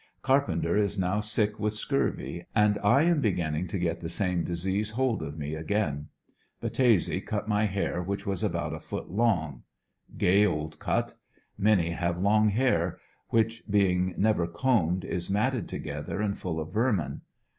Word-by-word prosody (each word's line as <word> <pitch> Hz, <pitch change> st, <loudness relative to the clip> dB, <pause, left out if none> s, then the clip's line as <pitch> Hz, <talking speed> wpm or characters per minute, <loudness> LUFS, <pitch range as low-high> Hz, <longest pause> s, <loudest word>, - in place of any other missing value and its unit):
Carpenter 95 Hz, -12 st, +2 dB
is 100 Hz, -1 st, +1 dB
now 95 Hz, +2 st, +1 dB
sick 105 Hz, 0 st, 0 dB
with 105 Hz, 0 st, 0 dB
scurvy, 110 Hz, -7 st, -2 dB
and 105 Hz, -1 st, +3 dB
I 135 Hz, +8 st, +5 dB
am 170 Hz, -3 st, +3 dB
beginning 85 Hz, -, 0 dB
to 100 Hz, -, -3 dB
get 85 Hz, -2 st, -1 dB
the 80 Hz, -, -5 dB
same 90 Hz, -1 st, 0 dB
disease 95 Hz, +4 st, -1 dB
hold 120 Hz, +1 st, 0 dB
of 75 Hz, 0 st, -6 dB
me 75 Hz, 0 st, -4 dB
again. 80 Hz, -3 st, -1 dB, 0.5 s
Battese 115 Hz, -5 st, +2 dB
cut 105 Hz, -1 st, -3 dB
my 105 Hz, 0 st, +2 dB
hair 100 Hz, -3 st, -1 dB
which 100 Hz, +3 st, -4 dB
was 95 Hz, -3 st, -2 dB
about -, -, -1 dB
a -, -, -5 dB
foot -, -, -6 dB
long. 85 Hz, -, +1 dB, 0.6 s
Gay 100 Hz, +3 st, +4 dB
old 75 Hz, -6 st, -1 dB
cut. -, -, -1 dB, 0.4 s
Many 95 Hz, -5 st, +2 dB
have 85 Hz, 0 st, -1 dB
long 105 Hz, +3 st, +4 dB
hair, 100 Hz, -7 st, +1 dB, 0.3 s
which, 115 Hz, 0 st, +1 dB
being 95 Hz, -3 st, +2 dB
never 100 Hz, -5 st, +2 dB
combed, 90 Hz, -3 st, +1 dB
is 85 Hz, -2 st, -2 dB
matted 110 Hz, +2 st, 0 dB
together -, -, -5 dB
and 105 Hz, -2 st, 0 dB
full 80 Hz, -3 st, -4 dB
of 80 Hz, 0 st, -6 dB
vermin. 105 Hz, -, 0 dB
100 Hz, 160 wpm, -28 LUFS, 85-110 Hz, 0.6 s, I